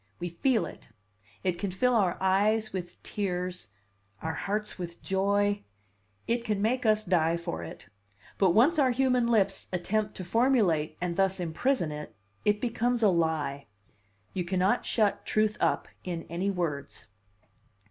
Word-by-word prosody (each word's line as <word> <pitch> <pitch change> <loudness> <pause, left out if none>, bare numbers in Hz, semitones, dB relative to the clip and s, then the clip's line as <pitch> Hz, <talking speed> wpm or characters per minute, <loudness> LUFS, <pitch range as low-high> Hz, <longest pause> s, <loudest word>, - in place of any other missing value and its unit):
We 175 - -3
feel 220 +3 +1
it; 150 - -11 0.5
it 180 -2 0
can 200 - -1
fill 250 +7 +1
our 195 -6 +2
eyes 205 +3 +2
with 175 -2 -6
tears, 180 - -3 0.6
our 160 0 -1
hearts 210 +2 -3
with 170 -1 -7
joy, 200 +1 +1 0.6
it 235 0 0
can 210 -3 -1
make 230 +3 +1
us 215 0 +3
die 170 -2 +2
for 85 - -4
it; 80 - -9 0.5
but 190 - +5
once 260 - +4
our 265 -3 +5
human 250 -1 +2
lips 200 -4 +2
attempt 210 +4 -1
to 185 - -5
formulate 205 - +2
and 175 -1 -2
thus 195 -1 +2
imprison 175 - 0
it, 150 0 -7 0.3
it 210 0 +3
becomes 240 0 0
a 210 - +6
lie. 155 -5 0 0.7
You 185 - -1
cannot 185 +6 +1
shut 215 -3 +1
truth 215 0 +1
up - - +1 0.2
in 170 -2 -4
any 180 +4 -1
words." 160 -7 -3
195 Hz, 150 wpm, -29 LUFS, 175-220 Hz, 0.7 s, a